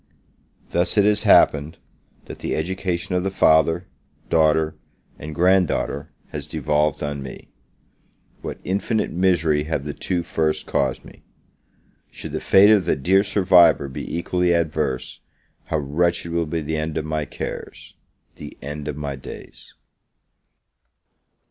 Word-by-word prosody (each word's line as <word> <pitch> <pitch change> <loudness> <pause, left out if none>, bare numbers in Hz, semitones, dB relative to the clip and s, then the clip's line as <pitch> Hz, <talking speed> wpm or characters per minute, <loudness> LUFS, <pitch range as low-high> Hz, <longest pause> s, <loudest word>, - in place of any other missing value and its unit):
Thus 85 +5 0
it 100 - +5
has 105 0 +3
happened, 75 +3 +4 0.5
that - - -10
the - - -2
education 90 +1 -3
of 90 - +1
the 95 - 0
father, 80 -1 +3 0.5
daughter, 80 -1 +3 0.5
and 75 +1 -7
grand 90 +1 +4
daughter, 70 +2 -3 0.2
has 75 -1 -6
devolved 75 -1 0
on 75 -1 -3
me. 65 -1 -10 0.9
What - - -6
infinite 100 +4 -1
misery 85 -5 +1
have 75 -3 -3
the 75 - -4
two 90 -2 -2
first 80 -2 -1
caused - - -1
me! - - -15 0.9
Should - - -9
the - - -3
fate 100 +2 +6
of 100 -5 +4
the - - +2
dear 95 +8 +3
survivor 90 -7 +4
be 65 - -7
equally 90 0 +1
adverse, 75 -6 -2 0.5
how 80 - -1
wretched 85 +4 -1
will 85 -1 -1
be 80 +1 -2
the 80 +1 -3
end 75 0 -3
of 80 - -2
my 75 -1 -2
cares - - -7 0.4
the - - -10
end 75 +1 -7
of 75 - -4
my 70 -2 -4
days! 65 - -12
80 Hz, 140 wpm, -22 LUFS, 75-90 Hz, 0.9 s, fate